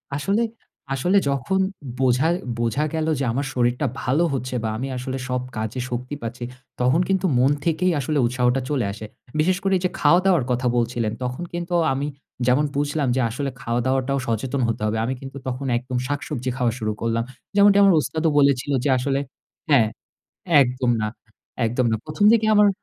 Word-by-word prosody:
আসলে, 195 +10 0 0.5
আসলে 175 +9 +2
যখন 140 +8 0 0.4
বোঝা 130 +3 +3 0.3
বোঝা 120 +5 0
গেল 160 -1 -1
যে - - 0
আমার 135 +5 -1
শরীরটা 125 +3 +1 0.2
ভালো 135 +7 +2
হচ্ছে 130 -1 -3
বা 110 - 0
আমি 130 +4 -3
আসলে 130 +1 -4
সব 125 0 0 0.2
কাজে 110 +3 -3
শক্তি 125 +4 -4
পাচ্ছি 120 +2 -5 0.4
তখন 125 +7 +3
কিন্তু 190 -1 +1
মন 130 +3 +4
থেকেই 175 +2 +2
আসলে 150 +3 -1
উৎসাহটা 125 +1 +1
চলে 135 -7 0
আসে। 105 +2 -8 0.3
বিশেষ 180 +4 +3
করে 195 0 +1
এই - - -6
যে - - +2
খাওয়া-দাওয়ার 175 +1 +4
কথা 125 +1 0
বলছিলেন। 120 -2 0
তখন 125 +6 -3
কিন্তু 175 +1 -4 0.2
আমি 140 +2 -2 0.4
যেমন 130 +4 +4
বুঝলাম 145 0 0
যে 130 - +2
আসলে 135 +4 -3
খাওয়াদাওয়াটাও 130 +3 0
সচেতন 125 +4 -1
হতে 115 -2 -2
হবে। 110 +1 0
আমি 130 - -1
কিন্তু 135 0 -8
তখন 130 +2 -3
একদম 125 +1 -4
শাকসবজি 140 -3 -3
খাওয়া 125 -3 +1
শুরু 110 -1 -1
করলাম। 115 0 0 0.3
যেমনটি 200 0 +6
আমার 195 -2 +6
ওস্তাদও 160 +5 0
বলেছিল 140 -1 +2
যে 145 - +1
আসলে 135 +2 0 0.5
হ্যাঁ, 125 -7 +5 0.8
একদম 125 0 -1
না, 110 - 0 0.6
একদম 125 +3 0
না। - - +2
১ম 155 +7 -1
দিকে 225 -1 +3
আমার, 210 0 +6
130 Hz, 175 wpm, -23 LUFS, 125-150 Hz, 0.8 s, যেমনটি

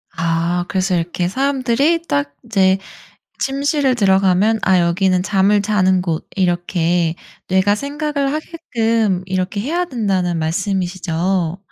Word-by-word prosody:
아 170 +1 0
그래서 185 -1 0
이렇게 175 +1 -1
사람들이 275 - +1
딱 145 0 -1
이제 190 -4 +3 0.6
침실을 275 -1 +1
들어가면 195 +1 +3
'아 190 -1 +3
여기는 180 +1 +1
잠을 200 +1 +2
자는 190 -3 +2
곳' 165 -3 -3
이렇게 175 -2 0 0.3
뇌가 190 +2 +3
생각을 285 +2 -2
하게끔 230 - -1
이렇게 190 +2 -2
해야 335 +9 -1
된다는 195 - -1
말씀이시죠? 180 0 -1
190 Hz, 275 characters per minute, -18 LUFS, 175-230 Hz, 0.6 s, 이제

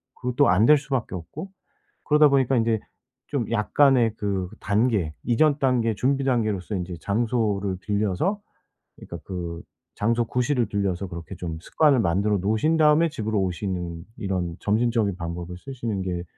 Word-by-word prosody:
그것도 125 -1 +1
안 95 +5 +4
될 150 +4 +7
수밖에 135 -8 -3
없고 115 - -8 0.6
그러다 150 -1 +5
보니까 135 -2 +2
인제 115 -2 +1 0.5
좀 130 -6 -2
약간의 115 +1 +3
그 100 -4 -2
단계, 105 -6 +1
이전 145 +5 +2
단계, 125 -4 +2
준비 135 +6 0
단계로서 110 -7 0
인제 90 -1 -4
장소를 105 -2 0
빌려서 105 - -1 0.6
그러니까 85 - -9
그 85 -3 -5 0.4
장소 115 +3 +1
구실을 125 +2 0
빌려서 100 -2 -2
그렇게 85 -2 -8
좀 85 -2 -5
습관을 145 - +3
만들어 100 +2 +1
놓으신 110 - +1
다음에 155 +2 +5
집으로 110 -6 -2
오시는 90 -3 -3
'이런 90 -4 -3
점진적인 110 -2 +1
방법을 85 0 -6
쓰시는 115 -3 -4
게 90 -2 -3
110 Hz, 335 characters per minute, -24 LUFS, 95-125 Hz, 0.6 s, 될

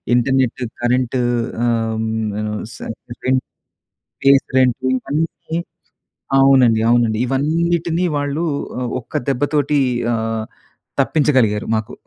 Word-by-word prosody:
internet, 130 0 +1 0.2
current 125 +1 +1 0.5
ఆహ్, 115 -1 0
హ్మ్ 110 -1 -2
ఆహ్, 105 0 -3
స - - -10 0.5
రెంట్ 130 0 +2 0.8
ఫేస్ 140 0 +5
రెంట్ 125 -2 +3
ఇవన్నీ 155 +5 -2 0.8
అవునండి 130 -5 +5
అవునండి 115 -2 +3
ఇవన్నిటిని 165 +5 0
వాళ్ళు 145 +2 -1 0.6
ఒక్క - - -7
దెబ్బతోటి 145 +2 +1 0.3
ఆహ్, 115 -1 -2 0.6
తప్పించగలిగారు 130 -9 +2
మాకు 110 -1 -4
130 Hz, 95 wpm, -19 LUFS, 115-145 Hz, 0.8 s, ఫేస్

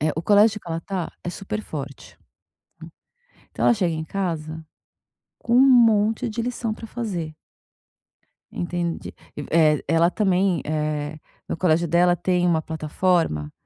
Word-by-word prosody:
Eh 155 +1 +1
o 160 - -2
colégio 210 +3 +4
que 175 - -12
ela 165 0 -3
tá 185 -3 -4
é 175 - -2
super 210 +3 -5
forte. 140 -2 -8 1.3
Então - - -3
ela 235 - +5
chega 180 -5 0
em 160 0 -4
casa, 160 -3 -4 0.7
com 235 - -1
um 250 - +7
monte 230 -4 +4
de 230 +2 -3
lição 235 -2 -3
pra 225 - -10
fazer. 185 -10 -5 1.2
Entende? 175 -1 -3 0.4
Eh, 155 -3 +3
ela 165 +1 +3
também, 190 -2 +1
eh, 150 0 -2 0.3
no - - -2
colégio 170 -1 +1
dela 175 +2 +4
tem 180 0 +1
uma 160 -2 +2
plataforma, 160 - -1
175 Hz, 140 wpm, -23 LUFS, 160-205 Hz, 1.3 s, um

